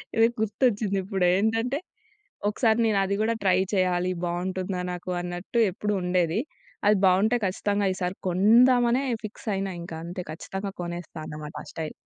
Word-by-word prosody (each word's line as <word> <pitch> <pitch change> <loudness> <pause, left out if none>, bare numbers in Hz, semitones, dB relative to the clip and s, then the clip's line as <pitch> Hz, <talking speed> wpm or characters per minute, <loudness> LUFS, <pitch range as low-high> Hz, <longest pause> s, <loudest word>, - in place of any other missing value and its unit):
ఇది 225 0 +6
గుర్తొచ్చింది 210 -2 +1
ఇప్పుడే. 190 -2 +1
ఏంటంటే, 225 +5 +1 0.7
ఒకసారి 220 +1 +2
నేను 215 -3 +2
అది 200 +1 0
గూడా 225 +1 +2
ట్రై 185 -2 +4 0.2
చేయాలి. 185 -1 +2
బావుంటుందా 180 +1 -2
నాకు. 180 +1 -7
అన్నట్టు 175 +6 -3
ఎప్పుడు 210 +3 -2
ఉండేది. 180 +1 +1 0.5
అది 210 -1 +5
బావుంటే 200 +6 +4
ఖచ్చితంగా 200 +2 0
ఈసారి 180 0 -2
కొందామనే 240 +6 +5 0.2
ఫిక్స్ 215 - -10
అయినా. 195 0 -2
ఇంకా 165 -2 -7
అంతే 175 +2 -5
ఖచ్చితంగా 195 +5 -5
కొనేస్తా 175 -1 -6
అనమాట 150 0 -7
ఆ - - -15
స్టైల్. 160 -1 -4
195 Hz, 145 wpm, -26 LUFS, 180-220 Hz, 0.7 s, ఇది